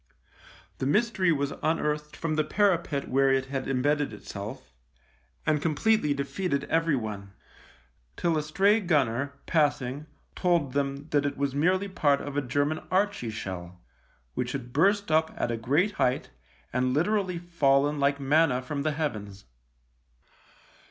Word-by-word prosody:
The 130 Hz, -, -1 dB
mystery 200 Hz, 0 st, +2 dB
was 140 Hz, -2 st, 0 dB
un -, -, -9 dB
THE -, -, 0 dB
LIEUTENANT 160 Hz, -, +3 dB
29 150 Hz, -, +2 dB
earthed 150 Hz, 0 st, -10 dB
from 165 Hz, -1 st, -2 dB
the 155 Hz, -, +2 dB
parapet 170 Hz, -6 st, +1 dB
where 135 Hz, +1 st, +3 dB
it 135 Hz, 0 st, +2 dB
had 135 Hz, -1 st, -4 dB
embedded 145 Hz, +2 st, +1 dB
itself, 105 Hz, -, -8 dB, 0.7 s
and 155 Hz, -2 st, +2 dB
completely 155 Hz, 0 st, +2 dB
defeated 140 Hz, +1 st, -2 dB
everyone; 110 Hz, -12 st, -1 dB, 0.8 s
till 170 Hz, -2 st, +1 dB
a 155 Hz, -, +1 dB
stray 195 Hz, +8 st, +3 dB
gunner, 140 Hz, -, +1 dB
passing, 145 Hz, -2 st, 0 dB, 0.3 s
told 170 Hz, -8 st, +1 dB
them 140 Hz, +1 st, -2 dB
that 145 Hz, -1 st, +3 dB
it 145 Hz, -, -4 dB
was 140 Hz, -1 st, -1 dB
merely 185 Hz, +7 st, +2 dB
part 145 Hz, -7 st, +2 dB
of 145 Hz, -1 st, -6 dB
a 145 Hz, -, +1 dB
German 145 Hz, +4 st, 0 dB
Archie 195 Hz, -, 0 dB
shell 90 Hz, -4 st, -6 dB, 0.3 s
— -, -, -38 dB
which 125 Hz, -, -2 dB
had 125 Hz, -3 st, -6 dB
burst 200 Hz, +4 st, +2 dB
up 160 Hz, +1 st, +2 dB
at 120 Hz, -, -1 dB
a -, -, 0 dB
great 145 Hz, -, +1 dB
height 130 Hz, -10 st, 0 dB, 0.4 s
and 125 Hz, +1 st, +1 dB
literally 185 Hz, +2 st, +1 dB
fallen 145 Hz, -4 st, +2 dB
like 140 Hz, 0 st, +2 dB
manna 140 Hz, -2 st, +2 dB
from 140 Hz, +2 st, -3 dB
the 155 Hz, +1 st, 0 dB
heavens. 105 Hz, -10 st, -4 dB
145 Hz, 155 wpm, -27 LUFS, 130-165 Hz, 0.8 s, LIEUTENANT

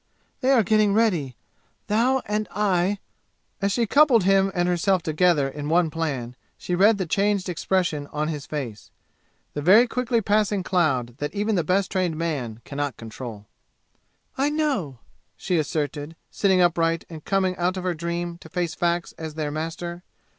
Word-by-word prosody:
They 260 Hz, -, 0 dB
are 255 Hz, -5 st, +5 dB
getting 210 Hz, 0 st, +3 dB
ready! 175 Hz, -, +1 dB, 0.5 s
Thou 245 Hz, +5 st, +2 dB
and 210 Hz, +1 st, -1 dB
I 195 Hz, -1 st, +1 dB, 0.3 s
" -, -, -44 dB
As 200 Hz, 0 st, +1 dB
she 235 Hz, +3 st, +1 dB
coupled 265 Hz, -3 st, +5 dB
him 195 Hz, +1 st, +3 dB
and 175 Hz, 0 st, +1 dB
herself 180 Hz, +1 st, +1 dB
together 155 Hz, -2 st, +2 dB
in 145 Hz, +2 st, -5 dB
one 165 Hz, -1 st, +3 dB
plan 140 Hz, -7 st, -3 dB, 0.2 s
she 180 Hz, -, -4 dB
read 200 Hz, +4 st, +5 dB
the 190 Hz, -, -2 dB
changed 200 Hz, +2 st, +1 dB
expression 175 Hz, -4 st, -1 dB
of 150 Hz, +1 st, -2 dB
his 150 Hz, -2 st, -5 dB
face 125 Hz, -9 st, -5 dB, 0.6 s
the 145 Hz, -, -3 dB
very 200 Hz, +10 st, +7 dB
quickly 245 Hz, -1 st, 0 dB
passing 205 Hz, -2 st, +1 dB
cloud 135 Hz, -, 0 dB
that 145 Hz, +6 st, -4 dB
even 210 Hz, +2 st, 0 dB
the 175 Hz, -4 st, +1 dB
best 185 Hz, +4 st, +1 dB
trained 180 Hz, -4 st, 0 dB
man 135 Hz, -9 st, -3 dB
can 140 Hz, -, -8 dB
not 145 Hz, -5 st, -2 dB
control. 110 Hz, -2 st, -8 dB, 0.9 s
"I 280 Hz, +2 st, +3 dB
know!" 280 Hz, -, -1 dB, 0.4 s
she 180 Hz, -3 st, 0 dB
asserted, 150 Hz, 0 st, -3 dB, 0.2 s
sitting 190 Hz, -2 st, +2 dB
upright 165 Hz, -1 st, +2 dB
and 160 Hz, -3 st, -10 dB
coming 190 Hz, -2 st, +1 dB
out 180 Hz, +2 st, 0 dB
of 185 Hz, -, -4 dB
her 180 Hz, -1 st, 0 dB
dream 170 Hz, +1 st, -4 dB
to 160 Hz, -, -13 dB
face 175 Hz, -1 st, -2 dB
facts 175 Hz, 0 st, -1 dB
as 160 Hz, -2 st, -6 dB
their 150 Hz, -2 st, -2 dB
master. 170 Hz, +3 st, -5 dB
175 Hz, 170 wpm, -24 LUFS, 155-200 Hz, 0.9 s, very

